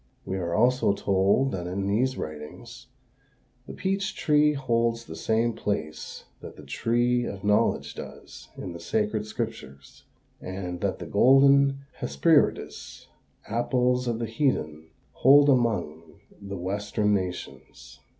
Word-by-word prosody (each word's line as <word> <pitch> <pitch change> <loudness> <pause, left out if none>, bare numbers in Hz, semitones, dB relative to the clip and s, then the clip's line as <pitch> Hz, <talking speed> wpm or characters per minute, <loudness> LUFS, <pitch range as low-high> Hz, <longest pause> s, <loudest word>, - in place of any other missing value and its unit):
We 95 - -3
are 85 -2 -2
also 125 -2 +3
told 100 +7 +2
that 90 -2 -4
in 95 +2 -3
these 125 +6 0
writings 75 -1 -8 0.8
"the - - -8
peach 195 +2 -2
tree 150 -1 +3
holds 115 -4 0
the - - -9
same 115 +1 0
place 80 -9 -4 0.2
that - - -10
the - - -13
tree 120 +1 0
of 95 -2 -7
knowledge 105 0 +1
does - - -11
in 90 - -6
the 85 - -8
sacred 105 +5 -1
scriptures, 105 - -7 0.4
and 90 -2 -6
that - - -1
the - - -7
golden 140 +1 +4
Hesperides, 160 -3 0 0.4
apples 125 +2 0
of 115 -2 -1
the 115 - -3
heathen, 80 - -2 0.2
hold 145 +2 +6
among 90 - 0 0.2
the 100 -1 -6
western 105 +3 -1
nations." 90 -8 -6
110 Hz, 130 wpm, -26 LUFS, 90-125 Hz, 0.8 s, hold